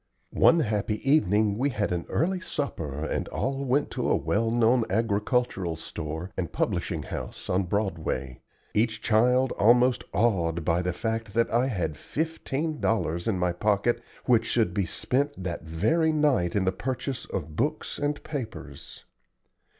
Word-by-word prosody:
One 165 0 +5
happy 105 -3 0
evening 105 -7 +3
we 140 +3 +2
had 105 -7 -1
an 85 -1 -2
early 185 +3 +1
supper 80 - -4
and - - -2
all 135 +1 -2
went 135 +2 +1
to - - -1
a - - +4
well 115 +2 0
known 120 +1 +3
agricultural 105 -3 0
store 80 +3 -6
and 90 -3 -3
publishing - - -1
house - - -6
on 95 +1 +2
Broadway, 80 - -2 0.3
each 110 +1 0
child 125 +4 +3
almost 120 +3 +5
awed 85 -8 +1
by 85 0 +2
the 90 0 -1
fact 110 +2 -3
that 115 0 +2
I 120 +3 +3
had 85 - -2
fifteen 160 - -3
dollars 85 -6 0
in 110 -4 +1
my 90 -1 +1
pocket 105 +5 +1 0.2
which 120 -3 +3
should 110 -7 +1
be 95 -2 0
spent 130 - -1
that 85 -2 -4
very 110 - +2
night 145 - +2
in 100 -2 +2
the 95 - +3
purchase 125 +5 -4
of 80 -4 -5
books 150 - -2
and 145 0 -1
papers. 130 -8 -7
110 Hz, 155 wpm, -27 LUFS, 90-130 Hz, 0.3 s, One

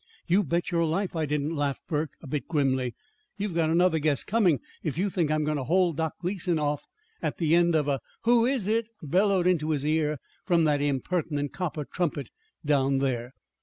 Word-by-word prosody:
"You 185 +3 +3
bet 170 +2 -1
your 170 -1 +2
life 175 +4 -1
I 160 -2 0
didn't," 150 +2 -1
laughed 145 -2 -1
Burke, 150 -1 -1
a - - -8
bit 145 +1 -3
grimly. 130 -5 0 0.4
"You've 200 -2 -2
got 165 -1 +1
another 170 0 +3
guess 150 -2 +1
coming 190 - +2 0.2
if 155 -2 -3
you 195 +2 0
think 170 -5 0
I'm 155 0 +1
going 150 0 0
to 135 - -2
hold 175 +2 +2
Doc 160 -1 -1
Gleason 180 -2 -1
off 150 -1 0 0.4
at - - -2
the 160 -2 +1
end 170 -1 +4
of 150 -2 +2
a 140 -2 +1 0.2
'Who 235 0 +4
is 260 -6 0
it?' 225 +1 +1 0.2
bellowed 185 +4 +2
into 165 -4 +2
his 145 -2 0
ear 155 -1 +1 0.3
from 170 -3 +3
that 150 -2 +2
impertinent 145 +1 -1
copper 160 -5 -3
trumpet 150 -7 -2 0.4
down 140 -2 +2
there." 130 -2 -1
160 Hz, 200 wpm, -27 LUFS, 145-180 Hz, 0.4 s, end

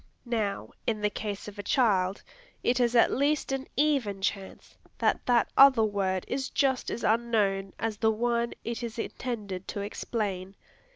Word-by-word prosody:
Now, 220 -5 -2 0.2
in 220 -2 0
the 210 0 +1
case 205 -2 -5
of 205 0 -9
a - - -1
child, 200 -5 +1 0.4
it 245 +1 +2
is 240 -1 +2
at 230 - +5
least 285 +1 +1
an 270 0 -2
even 275 -10 +1
chance 195 0 -4 0.2
that - - +1
that 240 -2 +3
other 270 -4 +7
word 195 -3 0
is 265 +1 -2
just 265 -3 +1
as 235 - -4
unknown 210 -4 +1
as 225 -1 -2
the 220 +1 +3
one 235 +1 0
it 235 +1 -4
is 235 -1 -5
intended 210 -6 -4
to 200 - -4
explain. 200 -2 -3
220 Hz, 165 wpm, -28 LUFS, 200-240 Hz, 0.4 s, other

